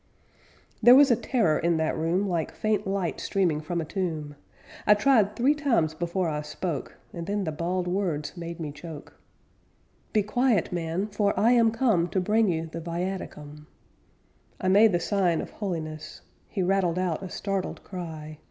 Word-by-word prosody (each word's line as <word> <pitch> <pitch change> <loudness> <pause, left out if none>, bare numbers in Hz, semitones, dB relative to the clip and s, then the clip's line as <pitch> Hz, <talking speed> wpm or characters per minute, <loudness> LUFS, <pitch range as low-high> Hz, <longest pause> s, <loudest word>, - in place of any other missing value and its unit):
There 245 +1 +9
was 280 -1 +7
a - - +6
terror 220 - +1
in 170 0 +1
that 160 0 0
room 170 +5 0
Like 170 -4 -1
faint 215 -2 0
light 190 -3 -2
streaming 175 -7 0
from 170 +3 -3
a 165 - -2
tomb. 155 -4 -3 0.5
I 210 - +8
tried 215 -3 +3
three 260 +5 +3
times 250 - +1
before 175 +2 -2
I 150 -2 -2
spoke, 150 -1 -5 0.2
And 170 0 -6
then 205 0 -1
the 160 - -2
bald 175 +3 -2
words 175 -6 -2
made 170 -1 -7
me 155 -3 -4
choke: 155 0 -10 1.0
'Be 215 - +2
quiet, 235 -2 +1
man, 170 +2 -1
for 205 -1 0
I 230 +3 +4
am 235 -2 +5
come 220 -7 +2
To 190 - 0
bring 215 +3 +2
you 165 -1 -1
the 165 +1 -7
viaticum!' 165 -4 -5 0.9
I 185 - 0
made 210 +3 +6
the 175 - +1
sign 180 -2 +1
of - - -5
holiness. 155 -6 -5 0.3
He 190 - -2
rattled 180 -2 +1
out 180 -3 -1
a 190 - -6
startled 195 -1 -3
cry. 160 -4 -7
180 Hz, 170 wpm, -26 LUFS, 160-205 Hz, 1.0 s, There